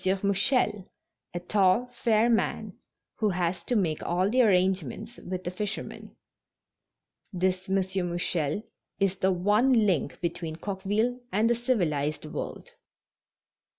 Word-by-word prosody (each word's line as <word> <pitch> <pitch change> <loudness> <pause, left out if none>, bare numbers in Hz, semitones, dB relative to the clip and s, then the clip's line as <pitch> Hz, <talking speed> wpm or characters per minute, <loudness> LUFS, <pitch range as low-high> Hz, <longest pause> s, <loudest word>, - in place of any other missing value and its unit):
Mouchel, 200 0 +2 0.4
a 175 - -4
tall, 190 +5 +2
fair 230 -1 +2
man 235 -2 0 0.4
who 215 -2 +2
has 180 -1 -1
to 245 - 0
make 170 -8 0
all 185 +4 0
the 255 +2 +4
arrangements 190 - +1
with 185 0 -6
the 175 - -3
fishermen. 205 +3 -5 1.2
This 185 0 -1
M. 195 - +2 0.3
Mouchel 175 +1 -1 0.4
is 195 -1 +1
the 190 0 +2
one 210 +6 +3
link 175 -8 0
between 165 -2 -3
Coqueville 205 +7 -1
and 215 +4 +2
the 240 - +4
civilized 170 - -1
world. 155 - -6
190 Hz, 120 wpm, -27 LUFS, 175-220 Hz, 1.2 s, the